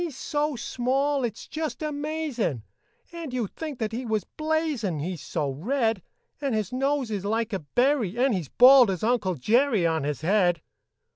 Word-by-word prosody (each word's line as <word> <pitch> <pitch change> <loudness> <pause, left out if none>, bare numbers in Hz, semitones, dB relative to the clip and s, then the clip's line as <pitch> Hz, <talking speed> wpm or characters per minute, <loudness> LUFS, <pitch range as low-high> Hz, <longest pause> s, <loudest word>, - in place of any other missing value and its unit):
"] - - 0
He's 310 -7 -5
so 300 -2 -1
small, 260 +4 0
it's 230 -2 -4
just 315 0 -4
amazin', 295 - -2 0.5
And 335 -5 -6
you 250 -3 -1
'd - - -13
think 310 -4 -5
that 220 -2 -2
he 240 +3 -4
was 220 -4 -1
blazin', 310 - -2
He's 170 +3 -4
so 145 -2 -2
red; 225 - 0 0.4
And 275 -5 0
his 215 0 -2
nose 270 -2 0
is 200 -3 -3
like 225 +2 -1
a 195 - 0
berry, 240 - +1
And 255 0 +3
he's 175 -9 -3
bald 255 -2 +7
as 185 -1 -3
Uncle 220 -6 +1
Jerry 220 - +2
On 160 -2 +1
his 145 -1 -3
head. 175 -2 +2
240 Hz, 185 wpm, -26 LUFS, 190-280 Hz, 0.5 s, bald